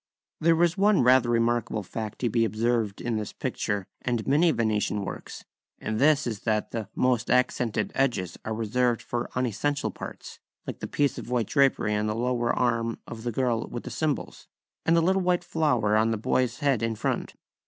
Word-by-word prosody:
There 165 +1 +4
is 175 +2 +1
one 205 -6 +4
rather 125 -1 +5
remarkable 115 -2 +1
fact 110 +2 -5
to 120 - +1
be 115 0 +2
observed 115 -2 0
in 120 -2 -1
this 105 -1 -4
picture 100 -2 -2 0.2
and 120 -3 -1
many 150 +6 +4
Venetian 105 -6 0
works, - - -7 0.3
and 110 0 -3
this 150 +1 +4
is 110 -4 -3
that 110 0 -1
the 110 -4 -4
#most 125 -2 +1
accented 125 -3 +1
edges 110 -10 0
are 110 - -4
reserved 115 +2 0
for 120 0 -3
unessential 130 +4 -1
parts#, - - -9 0.3
like - - -6
the - - -4
piece 145 -3 0
of - - -8
white 125 -2 +1
drapery 135 -4 +2
on 105 +1 0
the 105 - -1
lower 120 0 0
arm 115 -2 0
of 115 -1 -8
the 120 - -2
girl 120 -1 0
with 120 - -6
the - - -7
cymbals, 155 -3 -3 0.4
and 165 +1 +5
the - - +4
little 190 +3 +2
white 180 -1 +1
flower 125 -12 +1
on 110 +1 +3
the 110 - 0
boy's 125 +3 0
head 140 -6 +2
in 115 -1 -1
front. - - -2
120 Hz, 190 wpm, -27 LUFS, 110-135 Hz, 0.4 s, rather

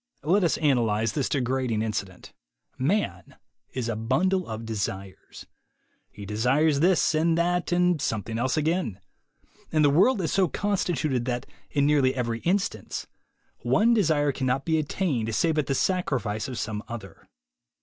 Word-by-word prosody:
Let 185 +7 +3
us 170 - +2
analyze 115 -7 +1
this 140 - -1
degrading 125 -4 0
incident. 100 -4 -5 0.5
Man 190 +11 -1 0.4
is 125 -3 -3
a 115 - -2
bundle 170 - 0
of 110 0 -6
desires. 100 -3 -5 0.6
He 105 - -10
desires 135 +9 +2
this, 175 +1 +3
and 165 +1 +2
that, 175 +1 0
and 180 -3 +2
something 110 -2 -2
else 130 +4 0
again. 155 - 0 0.7
And 155 -1 +3
the 145 - +5
world 195 - +4
is 165 - -1
so 190 -2 +3
constituted 155 - -1
that, 125 -1 -2 0.2
in 140 -1 +1
nearly 140 -3 +3
every 115 -3 -2
instance, 195 - -2 0.5
one 235 +2 +3
desire 155 -9 +2
cannot 130 0 -1
be 160 -1 +2
attained 140 - -1
save 160 +5 +2
at 150 - -1
the 135 - 0
sacrifice 130 - -1
of 130 -3 -6
some 105 -2 -3
other. 120 -1 -9
140 Hz, 150 wpm, -26 LUFS, 115-170 Hz, 0.7 s, the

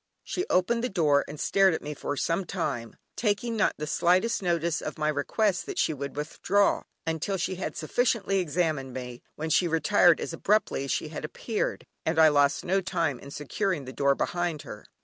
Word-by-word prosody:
She 365 +3 -3
opened 230 +6 +2
the 250 - 0
door, 150 -7 +3
and 150 - -8
stared 195 -1 +3
at - - -6
me 150 - -4
for 145 0 -4
some 165 +7 0
time, 140 - -3 0.2
taking 225 +1 0
not 215 - +2
the 150 - -3
slightest 180 +8 +2
notice 170 -2 0
of - - -5
my 155 -1 0
requests 180 +7 +1
that 400 - -6
she - - +2
would 140 -1 -6
withdraw, 180 +7 +1 0.2
until 165 +4 -1
she 185 +1 -2
had 185 - -4
sufficiently 195 +2 +1
examined 155 -6 -1
me, 125 -1 -6
when 160 +1 -4
she 175 - +4
retired 170 +1 +4
as - - -4
abruptly 195 -5 +1
as 140 - -3
she 155 - -1
had 155 - -6
appeared, 210 +8 -3 0.2
and 160 +1 -1
I 160 -1 +8
lost 145 -1 +2
no 195 +2 +2
time 170 -8 -1
in 140 - -11
securing 150 +2 -2
the 130 - -8
door 140 +2 +2
behind 175 -2 -2
her. - - -10
165 Hz, 195 wpm, -27 LUFS, 150-195 Hz, 0.2 s, I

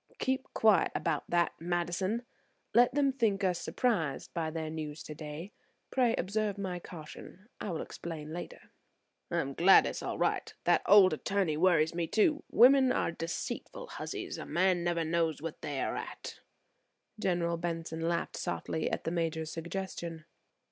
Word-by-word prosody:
"Keep 260 0 -1
quiet 215 -3 +4
about 160 -4 -1
that, 175 0 +2
Madison; 175 +6 -1 0.5
let 245 +3 +5
them 280 -2 +3
think 220 -6 +1
us 180 -2 +1
surprised 170 - -1
by 165 -2 -1
their 160 -1 -4
news 155 -1 -5
today. 155 +4 -7 0.4
Pray 245 -3 +3
observe 205 +2 -1
my 185 -3 -3
caution; 175 +4 -11
I - - -4
will 165 - -2
explain 155 -2 -7
later. 175 - -8 0.6
"I - - -1
am 140 0 -4
glad 180 +6 +7
it - - 0
is - - -5
all - - -3
right. - - 0
That - - +4
old 195 -4 +8
attorney 185 0 0
worries 165 -1 +3
me, 170 -1 -1
too. 300 - +2
Women 260 +2 +6
are 250 - +1
deceitful 170 - -5
hussies; - - -5
a - - -6
man 180 0 +2
never 170 -1 0
knows 165 -1 0
what 165 +1 -6
they 140 -2 -3
are - - -1
at." - - -7 0.8
General 175 -4 0
Benson 165 -1 -4
laughed 170 +1 -1
softly 160 - -2
at - - -3
the 165 - -2
Major's 160 -2 -1
suggestion. 170 -2 -5
170 Hz, 160 wpm, -31 LUFS, 160-200 Hz, 0.8 s, old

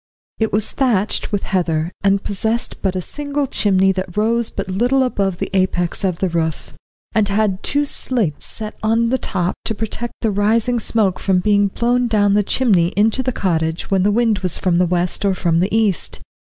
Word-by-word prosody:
It 220 -1 0
was 210 +1 +1
thatched 225 -7 0
with 205 -2 -1
heather, 170 -3 -1
and 200 0 +2
possessed 220 +4 -1
but 190 -2 -1
a 185 - -1
single 290 - -3
chimney 195 -6 +2
that 185 -1 -5
rose 230 +2 +2
but 195 - -5
little 245 +8 +1
above 195 -7 -1
the - - -4
apex 185 -1 +1
of 185 -3 0
the 190 - 0
roof, 160 -2 -3 0.4
and 210 -2 +2
had 200 -1 0
two 290 +1 +1
slates 230 - -1
set 215 -1 -5
on 230 +1 +1
the 260 +1 0
top 180 -2 -1
to 220 - 0
protect 225 +3 -4
the 225 - +1
rising 225 +4 +1
smoke 205 -4 0
from 190 -2 +1
being 205 +2 +2
blown 240 +4 0
down 205 -3 +2
the 210 - +4
chimney 200 -5 +2
into 220 +5 +2
the 260 0 -1
cottage 165 -6 -2
when 190 -1 +3
the 200 - +3
wind 225 -1 +2
was 185 -3 +1
from 175 -2 +1
the 180 - +3
west 180 +2 -1
or 195 -2 +1
from 170 -2 +1
the 185 +3 +1
east. 215 -4 +1
205 Hz, 195 wpm, -18 LUFS, 185-225 Hz, 0.4 s, the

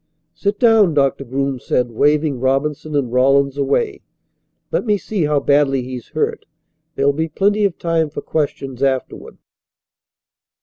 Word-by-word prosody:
"Sit 200 0 -2
down," 220 -8 +4
Doctor 140 -1 +1
Groom 135 +1 -2
said, 125 0 -1
waving 145 +2 +1
Robinson 140 +3 -1
and 130 -4 -1
Rawlins 135 +2 +3
away. 390 - -1 0.7
"Let - - 0
me 210 -3 +1
see 195 -4 -2
how 150 -1 +2
badly 140 -2 +2
he's 125 -2 -7
hurt. - - -3 0.5
There'll 140 +1 +2
be 160 +3 -2
plenty 205 +6 +1
of 190 -4 -1
time 165 -2 0
for 145 - -6
questions 135 -4 -3
afterward." 135 -2 -2
140 Hz, 140 wpm, -19 LUFS, 135-165 Hz, 0.7 s, down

